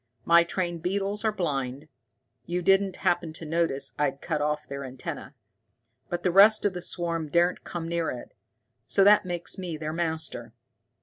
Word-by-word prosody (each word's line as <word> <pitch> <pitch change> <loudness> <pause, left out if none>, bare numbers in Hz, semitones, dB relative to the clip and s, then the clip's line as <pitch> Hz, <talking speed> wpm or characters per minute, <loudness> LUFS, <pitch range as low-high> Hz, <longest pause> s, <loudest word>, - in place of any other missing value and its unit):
My 170 0 +6
trained 175 -1 -3
beetles 200 +4 -2
are 220 - +2
blind 140 -6 -3 0.6
you 175 +1 -2
didn't 195 0 +3
happen 175 -2 +1
to 165 - -8
notice 150 -4 0
I'd 140 -2 0
cut 155 -2 -2
off 150 0 -1
their 140 0 -6
antenna? 130 +2 -7 0.7
But 175 0 -3
the 180 - +2
rest 205 +4 +6
of 200 - +2
the 180 - -5
swarm 170 -3 -2
daren't 175 +4 +2
come 170 -2 -5
near 170 -1 -1
it. 120 - -7 0.6
So 195 - +3
that 205 0 +6
makes 175 +1 -3
me 175 -4 -4
their 155 0 -4
master. 160 -8 -2
170 Hz, 170 wpm, -27 LUFS, 150-180 Hz, 0.7 s, My